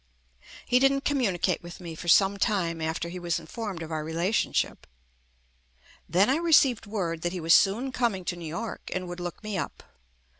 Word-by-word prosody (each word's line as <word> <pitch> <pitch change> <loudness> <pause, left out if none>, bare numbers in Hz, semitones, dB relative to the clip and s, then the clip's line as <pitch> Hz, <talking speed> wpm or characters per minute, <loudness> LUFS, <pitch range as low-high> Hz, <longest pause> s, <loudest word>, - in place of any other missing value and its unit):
He 250 - +3
didn't 275 +1 +2
communicate 195 - +1
with 175 0 -10
me 170 -3 -7
for 165 +2 -9
some 195 +3 +5
time 175 -7 0
after 160 +1 -2
he 180 +1 -6
was 170 -1 -1
informed 180 +1 -6
of 160 - -8
our 155 -1 -2
rela 165 +4 -1
tionship. 215 - 0 1.3
Then 190 +4 +4
I 270 - +3
received 295 -9 +4
word 175 -6 -3
that 175 +1 -2
he 185 - -3
was 165 0 +4
soon 230 +7 +4
coming 230 -8 -1
to 175 - -2
New 170 -2 -7
York 225 +8 -5
and 185 -1 -3
would 175 0 -7
look 175 +4 -6
me 210 -3 -3
up. - - -5
185 Hz, 190 wpm, -27 LUFS, 170-225 Hz, 1.3 s, some